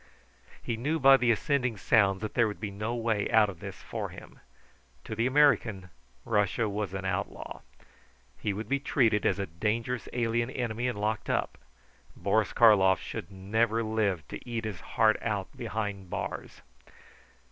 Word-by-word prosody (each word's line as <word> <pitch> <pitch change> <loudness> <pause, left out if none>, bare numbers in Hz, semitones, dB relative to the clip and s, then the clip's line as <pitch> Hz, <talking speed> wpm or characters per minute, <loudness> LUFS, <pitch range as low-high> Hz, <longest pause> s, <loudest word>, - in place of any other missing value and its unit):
He 115 - -2
knew 150 +8 0
by 135 -2 +7
the 125 -2 +1
ascending 125 -1 +1
sounds 95 -1 +3
that 110 - -4
there 115 -2 +3
would 105 - -6
be 105 -2 -4
no 105 +4 -3
way 115 -3 0
out 110 -2 +5
of 90 - -14
this - - -7
for - - -4
him. - - -13 0.6
To - - -6
the 115 +3 +1
American, 120 -10 +3 0.3
Russia 105 +1 +1
was 100 -2 -3
an 95 0 -4
outlaw. 90 -1 -4 0.8
He 105 - -1
would 105 +3 -5
be 140 +1 +1
treated 115 -6 +2
as - - +1
a 100 - -2
dangerous 115 +8 -2
alien 120 0 0
enemy 120 -2 -2
and 120 -5 -3
locked 105 0 -2
up. - - -1 0.6
Boris 110 -2 +1
Karlov 100 -5 +5
should - - -6
never 110 +4 0
live 105 - -1
to - - -7
eat 115 -1 -3
his 105 -5 -5
heart 110 -1 +2
out 105 -4 -3
behind 105 -5 -4
bars. - - -5
110 Hz, 165 wpm, -29 LUFS, 100-120 Hz, 0.8 s, by